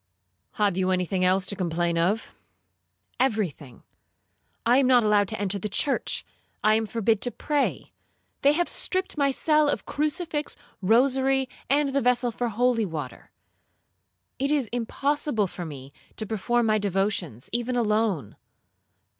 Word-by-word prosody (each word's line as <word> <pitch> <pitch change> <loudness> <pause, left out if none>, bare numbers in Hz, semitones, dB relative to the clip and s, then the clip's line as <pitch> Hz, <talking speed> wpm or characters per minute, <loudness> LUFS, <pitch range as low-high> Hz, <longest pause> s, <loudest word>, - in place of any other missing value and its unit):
'—'Have 205 -3 +1
you 185 0 +1
any 185 -1 +1
thing 185 +1 -1
else 185 +1 +3
to 200 - 0
complain 175 -2 -1
of?'—'Every 210 - -3
thing; 130 -4 -15 0.8
I 240 +2 +5
am 270 -2 +4
not 250 -2 +5
allowed 210 -1 +3
to 215 - -5
enter 200 0 -1
the 210 - -4
church,—I 215 -2 -1
am 220 0 +1
forbid 220 -1 0
to 245 - +1
pray,—they 285 0 -2
have 350 +3 +1
stripped 375 +1 +1
my 280 -2 +2
cell 300 +2 +3
of - - -2
crucifix, 300 0 -2 0.2
rosary, 265 +5 +3 0.2
and 285 +1 +2
the 275 +1 0
vessel 245 0 +2
for 240 +1 -2
holy 235 +1 +1
water. 150 -6 -7 1.1
It 275 +1 0
is 285 -7 0
impossible 245 0 -1
for 175 -1 -7
me 140 -2 -10 0.2
to 215 - -3
perform 225 +3 0
my 215 -1 +2
devotions 195 - -2
even 240 +1 -1
alone.' 210 - 0
225 Hz, 140 wpm, -25 LUFS, 190-265 Hz, 1.1 s, I